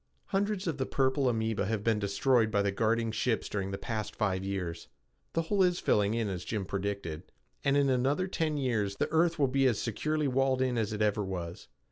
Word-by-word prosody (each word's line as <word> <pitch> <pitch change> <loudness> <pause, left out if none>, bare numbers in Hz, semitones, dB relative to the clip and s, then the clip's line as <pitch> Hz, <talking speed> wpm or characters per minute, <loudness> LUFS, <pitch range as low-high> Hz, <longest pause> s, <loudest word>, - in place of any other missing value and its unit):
Hundreds 200 0 0
of 160 -5 -2
the 130 - +1
purple 135 0 +2
amoeba 110 -3 0
have 110 -2 -1
been 110 -1 +2
destroyed 110 +3 +2
by 100 -2 +1
the 100 - +1
guarding 115 +2 +1
ships 110 +1 0
during 100 -2 -3
the 95 - -3
past 110 -1 -4
five 95 -3 0
years. 90 -4 -4 0.5
The 165 - +1
hole 195 +4 +1
is 180 -1 +3
filling 105 +1 +2
in 115 -2 0
as 90 -4 -4
Jim 105 0 -3
predicted, 95 -4 -4 0.3
and 140 0 +3
in 140 -1 +3
another 135 +8 +1
ten 160 -5 -1
years 110 -8 0
the - - -1
earth 165 +1 +3
will 140 -3 +3
be 135 +1 +3
as 120 -4 +2
securely 150 +6 -1
walled 135 0 +2
in 130 -1 0
as 110 -2 0
it 105 0 0
ever 105 0 +1
was. 90 -3 -5
115 Hz, 210 wpm, -30 LUFS, 100-140 Hz, 0.5 s, is